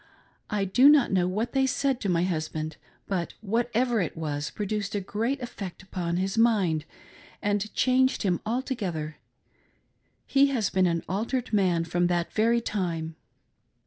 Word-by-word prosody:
I 205 -2 0
do 250 +9 +6
not 295 -4 +5
know 180 -2 +2
what 210 +6 -1
they 265 -1 +3
said 270 -1 0
to 200 - -1
my 170 -1 +2
husband, 155 -3 -3 0.3
but 180 -4 -2
whatever 235 +2 +1
it 170 - -3
was, 150 -2 -3
it - - -21
produced 210 0 -2
a - - +1
great 225 +8 -2
eifect 195 -7 -7
upon 175 -2 -3
his 195 +4 -1
mind, 190 -9 +3 0.5
and 205 +1 -1
changed 260 0 +3
him 180 -4 +1
altogether 210 - -3 0.6
— - - -44 0.3
he 280 0 +4
has 245 -8 0
been 185 -1 +3
an 170 -1 0
altered 230 +6 -2
man 180 -5 +3
from 175 +1 +1
that 175 -1 -1
very 230 +2 +3
time. 170 -7 -3
200 Hz, 160 wpm, -27 LUFS, 175-235 Hz, 0.6 s, do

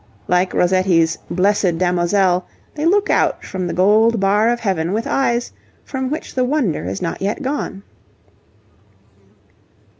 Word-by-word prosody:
Like 180 +1 +1
Rossetti's 180 -3 +2
'Blessed 185 -2 +1
Damozel,' 180 +1 +1 0.3
they 305 +2 -1
look 410 +5 +2
out - - +1
from 185 -2 -4
the - - -3
gold 215 +4 +3
bar 205 +3 +2
of 240 0 -1
heaven 185 -4 -1
with 225 +2 -1
eyes 240 -3 0 0.3
from 265 -1 -3
which 305 +3 -5
the 255 - +1
wonder 250 - -1
is 95 +2 -4
not 165 - -4
yet 205 +8 -2
gone. 265 -7 -4
195 Hz, 140 wpm, -19 LUFS, 180-240 Hz, 0.3 s, gold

